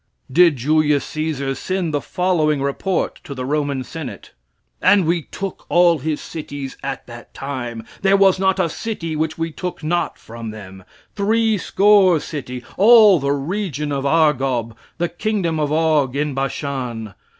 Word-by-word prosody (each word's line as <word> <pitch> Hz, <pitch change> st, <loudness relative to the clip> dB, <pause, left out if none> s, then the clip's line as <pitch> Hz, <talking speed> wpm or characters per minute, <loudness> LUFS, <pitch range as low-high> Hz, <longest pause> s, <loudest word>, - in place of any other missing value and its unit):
Did 170 Hz, +1 st, +5 dB
Julius 150 Hz, +2 st, +2 dB
Caesar 155 Hz, -4 st, -2 dB
send 175 Hz, +4 st, -3 dB
the 145 Hz, -, 0 dB
following 165 Hz, -5 st, +1 dB
report 140 Hz, +7 st, -1 dB
to 140 Hz, -, -8 dB
the 130 Hz, -1 st, -4 dB
Roman 140 Hz, -1 st, -1 dB
Senate? 155 Hz, 0 st, -8 dB, 0.5 s
"And 195 Hz, -2 st, +5 dB
we 170 Hz, +1 st, +1 dB
took 195 Hz, +4 st, -7 dB
all 175 Hz, -2 st, +4 dB
his 150 Hz, +2 st, -2 dB
cities 145 Hz, -4 st, -7 dB
at 135 Hz, -1 st, -5 dB
that 120 Hz, 0 st, -12 dB
time, 120 Hz, -5 st, -5 dB, 0.2 s
there 195 Hz, 0 st, +4 dB
was 195 Hz, -1 st, +4 dB
not 190 Hz, 0 st, +2 dB
a 180 Hz, -, +2 dB
city 165 Hz, -3 st, -4 dB
which 160 Hz, +1 st, -2 dB
we 165 Hz, 0 st, -2 dB
took 180 Hz, 0 st, -6 dB
not 175 Hz, +2 st, -1 dB
from 115 Hz, 0 st, -8 dB
them, 95 Hz, -3 st, -10 dB, 0.3 s
three 220 Hz, +2 st, +2 dB
score 195 Hz, -4 st, +4 dB
city, 125 Hz, -5 st, -6 dB
all 215 Hz, -3 st, +7 dB
the 140 Hz, 0 st, 0 dB
region 150 Hz, 0 st, -2 dB
of 140 Hz, -1 st, -2 dB
Argob, 135 Hz, -6 st, +1 dB, 0.2 s
the 175 Hz, 0 st, 0 dB
kingdom 175 Hz, -3 st, -1 dB
of 150 Hz, -1 st, 0 dB
Og, 155 Hz, -4 st, +2 dB
in 150 Hz, 0 st, -1 dB
Bashan. 130 Hz, -5 st, -3 dB
155 Hz, 155 wpm, -20 LUFS, 135-180 Hz, 0.5 s, all